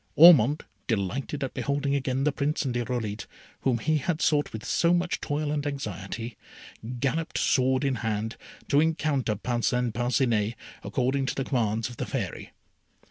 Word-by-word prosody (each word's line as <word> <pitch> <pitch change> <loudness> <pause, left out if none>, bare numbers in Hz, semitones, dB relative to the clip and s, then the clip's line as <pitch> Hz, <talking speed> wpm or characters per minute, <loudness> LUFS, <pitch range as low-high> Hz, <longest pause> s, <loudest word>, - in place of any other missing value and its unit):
Ormond, 150 -4 +7 0.2
delighted 120 +7 -2
at 135 - -3
beholding 140 0 -1
again 135 -1 0
the 150 - +3
Prince 145 +2 -1
and 130 - -1
Irolite, 120 -3 -2 0.3
whom 130 -3 +1
he 155 +7 +1
had 160 +3 -1
sought 145 -3 +2
with 110 - -7
so 170 0 +3
much 175 0 -1
toil 145 0 -1
and 150 -1 -1
anxiety, 115 -3 -5 0.6
galloped, 150 +5 -1
sword 130 0 +2
in 135 -2 +1
hand, 110 0 -2 0.3
to 140 - +4
encounter 150 -7 +1
Parcin 120 +2 0
Parcinet, 120 -3 +1 0.3
according 135 +1 0
to - - -1
the 135 - -1
commands 115 -4 0
of 120 -1 -10
the - - -3
Fairy. - - -4
130 Hz, 155 wpm, -27 LUFS, 115-145 Hz, 0.6 s, Ormond